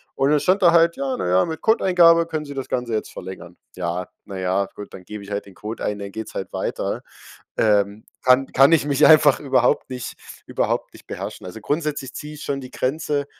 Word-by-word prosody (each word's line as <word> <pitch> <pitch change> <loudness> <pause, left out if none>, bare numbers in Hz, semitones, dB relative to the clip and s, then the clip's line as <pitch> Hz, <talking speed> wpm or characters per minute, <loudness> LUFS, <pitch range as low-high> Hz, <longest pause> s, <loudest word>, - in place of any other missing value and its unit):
Und 140 +2 +2
dann 150 - +4
stand 190 +2 +2
da 170 - +7
halt: 170 0 +4
„Ja, 135 -1 -2
na 90 - -2
ja, 90 +1 +4
mit 160 -1 -6
Codeeingabe 180 -6 +5
können 155 -2 -4
Sie 140 - -8
das 135 -1 -5
Ganze 125 -2 -2
jetzt 110 - -2
verlängern.“ 90 -1 -9 0.2
Ja, 90 0 -3 0.2
na 95 -2 -7
ja, 95 +1 0
gut, 105 - -10
dann 95 - -10
gebe 105 0 -8
ich 100 - -11
halt 100 - -3
den 100 -2 -16
Code 105 +5 -7
ein, 105 - -2
dann 100 -1 -7
geht's 110 +1 -7
halt 95 - -5
weiter. - - -3 0.5
Ähm, 105 -1 +1 0.2
kann 130 +1 +4
kann 135 +4 +5
ich 160 -4 +4
mich 140 -2 +3
einfach 150 -3 +6
überhaupt 135 -1 +1
nicht 125 -2 -6 0.3
überhaupt - - -1
nicht - - -16
beherrschen. - - -7
Also, 90 +4 -8
grundsätzlich 145 +2 -3
ziehe 150 0 -8
ich 150 - -9
schon 140 -1 -3
die 130 -1 -10
Grenze 145 +1 -1
130 Hz, 220 wpm, -22 LUFS, 100-150 Hz, 0.5 s, da